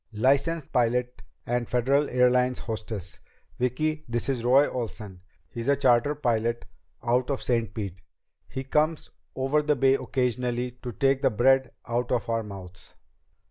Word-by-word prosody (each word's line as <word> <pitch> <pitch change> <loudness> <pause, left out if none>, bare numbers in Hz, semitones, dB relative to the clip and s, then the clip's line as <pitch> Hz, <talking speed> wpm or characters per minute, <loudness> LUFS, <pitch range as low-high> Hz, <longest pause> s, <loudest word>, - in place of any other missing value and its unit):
"Licensed 140 +7 +1
pilot 125 0 +1 0.2
and 120 -1 -1
Federal 135 +4 +2
Airlines 125 0 +3
hostess. 110 -4 -6 0.4
Vicki, 155 +5 0
this 120 +3 -2
is 125 -4 -1
Roy 135 +4 +5
Olsen. 105 -6 -6 0.3
He's 115 +9 -6
a 140 - +4
charter 135 +1 +3
pilot 120 -4 0 0.4
out 125 +2 +1
of 140 - -2
Saint 115 -3 0
Pete. 95 -5 -5 0.5
He 130 - -5
comes 155 +4 0 0.2
over 135 +3 +1
the 150 0 +1
Bay 135 0 +4
occasionally 125 -2 -1
to 125 - -5
take 135 +5 +1
the 140 - +4
bread 130 +3 +3 0.2
out 120 +1 -1
of 120 -5 0
our 115 0 +1
mouths." 95 -4 -10
125 Hz, 145 wpm, -26 LUFS, 115-135 Hz, 0.5 s, Roy